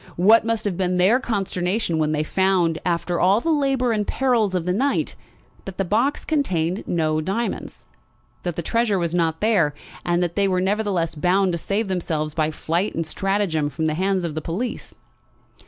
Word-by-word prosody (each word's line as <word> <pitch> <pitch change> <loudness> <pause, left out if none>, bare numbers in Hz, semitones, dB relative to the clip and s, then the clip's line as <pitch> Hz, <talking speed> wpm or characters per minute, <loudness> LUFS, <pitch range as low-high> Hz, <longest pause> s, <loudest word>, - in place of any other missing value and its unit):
What 210 +6 +6
must 225 -1 -1
have 200 -3 -1
been 180 -1 0
their 195 +8 +4
consternation 195 -5 -1
when 155 -1 +1
they 155 0 0
found, 180 -2 +1
after 175 0 -1
all 190 +4 +4
the 330 +7 -1
labour 270 -5 +1
and 210 -2 -1
perils 235 -7 +1
of 175 -2 -1
the 180 - +1
night, 270 +8 0 0.5
that 190 -1 -8
the 195 - 0
box 235 +10 0
contained 185 - 0
no 155 -2 0
diamonds, 200 +9 -4 0.6
that 175 -2 -3
the 170 - -3
treasure 230 +1 +1
was 170 -2 -1
not 165 -2 0
there, 190 -10 +2 0.3
and 175 0 +1
that 170 -1 -3
they 200 -1 +2
were 185 -1 +1
nevertheless 190 -3 0
bound 180 +5 +2
to 170 - -2
save 205 +6 -1
themselves 160 -5 -2
by 155 -1 0
flight 170 +5 -2
and 165 - -1
stratagem 190 -4 -1
from 160 +3 -3
the 155 - +1
hands 190 +2 0
of 165 -3 -3
the 155 - -3
police! 195 +11 -4
185 Hz, 190 wpm, -22 LUFS, 165-210 Hz, 0.6 s, What